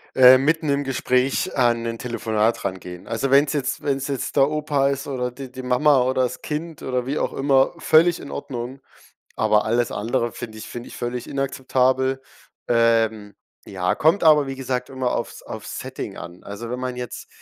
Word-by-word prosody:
Ähm, 130 Hz, 0 st, +8 dB
mitten 160 Hz, +1 st, +1 dB
im 140 Hz, 0 st, +1 dB
Gespräch 130 Hz, 0 st, 0 dB
an 120 Hz, -3 st, +2 dB
'nen 115 Hz, -1 st, -4 dB
Telefonat 115 Hz, -2 st, -1 dB
rangehen. 90 Hz, -2 st, -6 dB
Also, 115 Hz, +4 st, -1 dB
wenn's 140 Hz, +2 st, +4 dB
jetzt 140 Hz, -2 st, -2 dB
wenn's 135 Hz, -1 st, -1 dB
jetzt 140 Hz, -3 st, -3 dB
der 135 Hz, 0 st, +5 dB
Opa 150 Hz, -2 st, +1 dB
ist 140 Hz, 0 st, -3 dB
oder 125 Hz, -3 st, -2 dB
die 130 Hz, +1 st, -9 dB
die 130 Hz, -, -7 dB
Mama 130 Hz, +2 st, +3 dB
oder 130 Hz, +1 st, +1 dB
das 125 Hz, 0 st, -3 dB
Kind 160 Hz, +1 st, -5 dB
oder 125 Hz, -1 st, -2 dB
wie 140 Hz, +3 st, -2 dB
auch -, -, -1 dB
immer, 135 Hz, +1 st, +3 dB
völlig 170 Hz, +1 st, +4 dB
in 140 Hz, -, -9 dB
Ordnung, 130 Hz, -1 st, -6 dB, 0.6 s
aber 105 Hz, 0 st, +2 dB
alles 120 Hz, +1 st, +1 dB
andere 120 Hz, +2 st, -1 dB
finde 110 Hz, -2 st, -8 dB
ich 110 Hz, -, -8 dB
finde 120 Hz, 0 st, -7 dB
ich -, -, -10 dB
völlig 120 Hz, 0 st, -4 dB
inakzeptabel. 130 Hz, -1 st, 0 dB, 0.5 s
Ähm, 115 Hz, -3 st, +2 dB, 0.3 s
ja, 90 Hz, -2 st, -1 dB
kommt 165 Hz, +6 st, +2 dB
aber 150 Hz, -3 st, +6 dB
wie 135 Hz, -, -4 dB
gesagt 130 Hz, -1 st, -3 dB
immer 130 Hz, -2 st, -2 dB
aufs -, -, -5 dB
aufs -, -, -7 dB
Setting -, -, -6 dB
an. 85 Hz, +1 st, -10 dB
Also, 115 Hz, +4 st, -7 dB
wenn 125 Hz, -, -3 dB
man 130 Hz, -1 st, -3 dB
jetzt, 125 Hz, -1 st, -7 dB
130 Hz, 185 wpm, -22 LUFS, 120-140 Hz, 0.6 s, Ähm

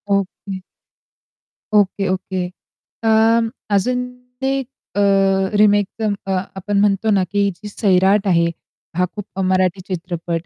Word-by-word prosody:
Okay. 195 Hz, -1 st, -2 dB, 1.2 s
Okay, 195 Hz, 0 st, +1 dB
okay. 185 Hz, -1 st, -2 dB, 0.6 s
अं, 225 Hz, +1 st, +4 dB, 0.3 s
अजून 250 Hz, +5 st, +1 dB, 0.3 s
ते 270 Hz, +1 st, +1 dB
एक 265 Hz, -, -6 dB, 0.3 s
अ, -, -, 0 dB, 0.6 s
रिमेक 205 Hz, -1 st, +4 dB
अं, 215 Hz, -2 st, +1 dB
अ -, -, -1 dB, 0.3 s
आपण 200 Hz, +1 st, 0 dB
म्हणतो 205 Hz, +1 st, +2 dB
ना 190 Hz, -, +2 dB
की 200 Hz, 0 st, +2 dB
जी 210 Hz, +4 st, -10 dB
सैराट 195 Hz, 0 st, +3 dB
आहे 170 Hz, -3 st, +4 dB, 0.5 s
हा 180 Hz, -, +3 dB
खूप 205 Hz, -2 st, -7 dB
मराठी 185 Hz, 0 st, +1 dB
चित्रपट 170 Hz, -2 st, -3 dB
200 Hz, 125 wpm, -19 LUFS, 185-210 Hz, 1.2 s, अं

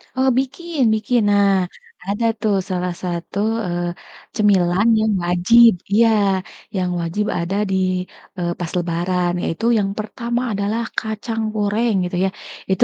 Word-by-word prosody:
Kalau 260 Hz, +1 st, +3 dB
bikin, 310 Hz, +4 st, -3 dB
bikin. 225 Hz, +3 st, +1 dB
Nah, 200 Hz, -1 st, +4 dB, 0.6 s
ada 205 Hz, +3 st, 0 dB, 0.2 s
tuh 210 Hz, -2 st, +2 dB
salah 180 Hz, -1 st, -1 dB
satu, 175 Hz, +1 st, -4 dB, 0.3 s
eee, 175 Hz, 0 st, -2 dB, 0.5 s
cemilan 195 Hz, -1 st, +3 dB
yang 220 Hz, -1 st, +2 dB
wajib 205 Hz, +7 st, +6 dB, 0.2 s
iya, 230 Hz, +2 st, +5 dB, 0.7 s
yang 180 Hz, -1 st, 0 dB
wajib 170 Hz, +5 st, -1 dB
ada 170 Hz, +3 st, -2 dB
di 190 Hz, -, 0 dB, 0.6 s
eee, 175 Hz, -1 st, -1 dB
pas 175 Hz, -2 st, -4 dB
Lebaran 175 Hz, +1 st, 0 dB
yaitu 185 Hz, +8 st, -2 dB
yang 195 Hz, -1 st, 0 dB
pertama 235 Hz, +3 st, -3 dB
adalah 205 Hz, +3 st, -1 dB, 0.2 s
kacang 220 Hz, +1 st, -4 dB
goreng, 215 Hz, +2 st, +1 dB
gitu 180 Hz, 0 st, -3 dB
ya -, -, +1 dB, 0.4 s
itu 190 Hz, -, +4 dB
200 Hz, 135 wpm, -20 LUFS, 180-225 Hz, 0.7 s, wajib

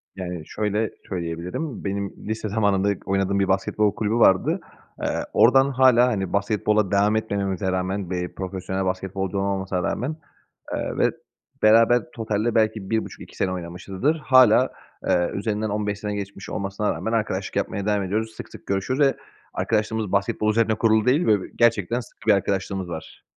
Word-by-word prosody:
Yani, 90 Hz, -4 st, -5 dB
şöyle 105 Hz, +1 st, -1 dB, 0.2 s
söyleyebilirim, 90 Hz, -, -4 dB
benim 100 Hz, 0 st, -3 dB
lise 110 Hz, 0 st, -3 dB
zamanında 100 Hz, -2 st, +1 dB
k -, -, -7 dB
oynadığım 95 Hz, 0 st, +1 dB
bir 95 Hz, -, +2 dB
basketbol 100 Hz, +2 st, +1 dB
kulübü 110 Hz, 0 st, -1 dB
vardı. 95 Hz, -5 st, +4 dB, 0.4 s
Eee, -, -, +1 dB, 0.3 s
oradan 135 Hz, +3 st, +5 dB
hâlâ, 125 Hz, -2 st, +5 dB
hani, 95 Hz, -6 st, -2 dB
basketbola 105 Hz, 0 st, +1 dB
devam 100 Hz, +2 st, +3 dB
etmememize 100 Hz, -3 st, -1 dB
rağmen, 95 Hz, 0 st, -2 dB
bir 90 Hz, -1 st, -3 dB
profesyonel 95 Hz, 0 st, -3 dB
basketbolcu 95 Hz, +1 st, -2 dB
olmamasına 95 Hz, -2 st, -1 dB
rağmen, 135 Hz, -, -2 dB, 0.6 s
eee, -, -, -3 dB
ve -, -, +3 dB, 0.5 s
beraber 115 Hz, +2 st, +6 dB
totalde 110 Hz, 0 st, -1 dB
belki 110 Hz, -3 st, +1 dB
1,5-2 110 Hz, 0 st, -4 dB
sene 95 Hz, -, 0 dB
oynamışızdır. 90 Hz, -, -2 dB
Hâlâ, 130 Hz, -2 st, +5 dB, 0.4 s
ııı 90 Hz, -1 st, +2 dB
,üzerinden 105 Hz, +1 st, -1 dB
15 105 Hz, 0 st, -2 dB
sene 105 Hz, 0 st, -3 dB
geçmiş 100 Hz, -1 st, -6 dB
olmasına 100 Hz, +2 st, -2 dB
rağmen 110 Hz, -, -4 dB
arkadaşlık 105 Hz, -4 st, -2 dB
yapmaya 100 Hz, -1 st, -2 dB
devam 105 Hz, -2 st, +1 dB
ediyoruz. 110 Hz, +4 st, -2 dB
Sık -, -, -8 dB
sık -, -, -13 dB
görüşürüz 100 Hz, +8 st, -1 dB
ve 140 Hz, -2 st, +3 dB, 0.4 s
arkadaşlığımız 110 Hz, -1 st, -1 dB
basketbol 100 Hz, +2 st, +1 dB
üzerine 110 Hz, 0 st, +2 dB
kurulu 110 Hz, -1 st, +3 dB
değil 140 Hz, +7 st, +3 dB
ve, -, -, +5 dB
ııı, 100 Hz, -3 st, -1 dB
gerçekten 115 Hz, -1 st, +2 dB
sıkı 115 Hz, -, -13 dB
bir 110 Hz, -, +7 dB
arkadaşlığımız 95 Hz, -1 st, -1 dB
var. 80 Hz, -2 st, -8 dB
100 Hz, 155 wpm, -23 LUFS, 95-110 Hz, 0.6 s, bir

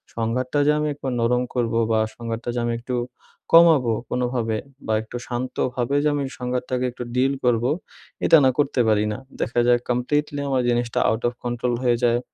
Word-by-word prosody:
সংঘাতটা 125 Hz, +5 st, -1 dB
যে -, -, +6 dB
আমি 150 Hz, -, 0 dB
একটু 140 Hz, -, -7 dB
নরম 125 Hz, +2 st, +2 dB
করবো 115 Hz, -2 st, 0 dB
বা 110 Hz, -, +3 dB, 0.2 s
সংঘাতটা 115 Hz, 0 st, -5 dB
যে -, -, 0 dB
আমি 120 Hz, -, 0 dB
একটু 125 Hz, +1 st, -4 dB, 0.6 s
কমাবো 160 Hz, -9 st, +6 dB, 0.2 s
কোনোভাবে 120 Hz, -3 st, -1 dB, 0.3 s
বা, 110 Hz, -, +1 dB
একটু 110 Hz, +2 st, -7 dB
শান্তভাবে 125 Hz, +1 st, -2 dB
যে -, -, +3 dB
আমি 140 Hz, -, -1 dB, 0.2 s
সংঘাতটাকে 125 Hz, 0 st, -2 dB
একটু 125 Hz, 0 st, -7 dB
ডিল 135 Hz, +2 st, +2 dB
করবো, 120 Hz, 0 st, +2 dB, 0.6 s
এটা 165 Hz, -, +7 dB
না -, -, +6 dB
করতে 140 Hz, -4 st, +2 dB
পারি 105 Hz, -1 st, +3 dB
না, -, -, -5 dB, 0.2 s
দেখা 120 Hz, +1 st, 0 dB
যায় 120 Hz, 0 st, +5 dB
কমপ্লিটলি 145 Hz, +4 st, 0 dB
আমার 130 Hz, -2 st, +2 dB
জিনিসটা 120 Hz, -1 st, 0 dB
আউট 110 Hz, +1 st, -1 dB
অফ 120 Hz, -, -2 dB
কন্ট্রোল 120 Hz, 0 st, -1 dB
হয়ে 120 Hz, -1 st, +3 dB
যায় 120 Hz, 0 st, +3 dB
125 Hz, 180 wpm, -23 LUFS, 120-130 Hz, 0.6 s, এটা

